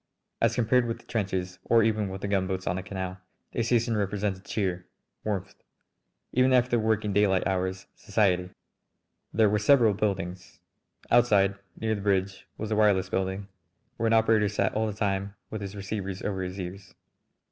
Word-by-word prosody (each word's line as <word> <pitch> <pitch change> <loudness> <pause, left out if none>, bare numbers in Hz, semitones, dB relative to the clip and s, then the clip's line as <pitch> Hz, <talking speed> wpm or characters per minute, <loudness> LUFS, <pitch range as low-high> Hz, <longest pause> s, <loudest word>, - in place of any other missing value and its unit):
As - - +3
compared 120 +1 +3
with 115 0 -2
the - - -20
trenches, 95 -4 -2
or 115 -1 +4
even 110 -2 +1
with 95 0 -6
the 100 - -2
gunboats 95 -1 -1
on 90 - 0
the - - -2
canal, 95 0 -5 0.3
the - - -1
station 115 0 +1
represented 100 -1 -1
cheer, 90 -4 -2 0.4
warmth; 100 -2 -3 0.8
even, 130 +1 +4
after 125 0 +3
the 120 - +3
working 110 -2 0
daylight 100 -2 +3
hours, 95 0 -1
society. 95 -3 +1 0.8
There 110 0 +4
were 105 +1 +2
several 115 0 +5
buildings. 95 -3 -3 0.5
Outside 105 -5 +5 0.3
near 110 0 0
the 100 - -3
bridge 100 -1 0
was 110 - -4
the 110 - +1
wireless 100 -3 +3
building, 95 +1 -2 0.5
where 115 - 0
an 115 - +3
operator 110 -2 +4
sat 100 -2 0
all 110 +1 0
the 105 - -3
time 100 -1 -2 0.2
with 110 - -4
his 100 0 -6
receivers 100 -1 -4
over 95 -2 -2
his 90 +1 -5
ears. 95 +1 -7
100 Hz, 170 wpm, -27 LUFS, 95-110 Hz, 0.8 s, several